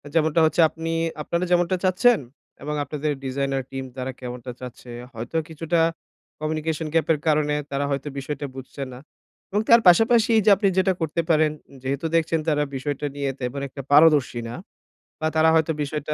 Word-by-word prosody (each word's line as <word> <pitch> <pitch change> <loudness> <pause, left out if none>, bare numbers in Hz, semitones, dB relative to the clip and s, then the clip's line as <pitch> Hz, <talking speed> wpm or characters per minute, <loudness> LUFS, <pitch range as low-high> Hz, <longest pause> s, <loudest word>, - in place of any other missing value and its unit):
যেমনটা 160 0 +3
হচ্ছে 155 +2 +2
আপনি 165 +1 -5 0.3
আপনারা 170 +4 -2
যেমনটা 175 +1 +3
চাচ্ছেন 195 +5 +4 0.4
এবং 150 +1 -3
আপনাদের 150 +1 -3
ডিজাইনার 135 0 -1
টিম 135 0 -4
তারা 130 0 -3
কেমনটা 125 0 -7
চাচ্ছে? 125 -1 -10 0.2
হয়তো 120 +8 -4
কিছুটা 165 +1 0 0.6
কমিউনিকেশন 155 +1 -2
গ্যাপ 165 - +2
এর 150 - -3
কারণে 150 -1 +2 0.2
তারা 140 +1 -1
হয়তো 140 +1 -2
বিষয়টা 145 +2 -5
বুঝছে 135 +1 -7
না। 125 - -10 0.5
এবং 205 +2 +1
তার 235 0 +8
পাশাপাশি 225 +5 +5
যে 215 - +6
আপনি 200 +1 +1
যেটা 190 0 +3
করতে 160 +1 0
পারেন 155 -1 +4 0.3
যেহেতু 140 +4 -2
দেখছেন 165 0 +2
তারা 150 -2 +2
বিষয়টা 145 +2 -3
নিয়ে 140 -1 -2
তেমন 125 +3 -3
একটা 140 +1 -8
পারদর্শী 150 -5 +5
না - - -6 0.6
বা 155 - 0
তারা 160 0 +5
হয়তো 160 0 +2
বিষয়টা 150 +1 -3
150 Hz, 165 wpm, -23 LUFS, 140-165 Hz, 0.6 s, তার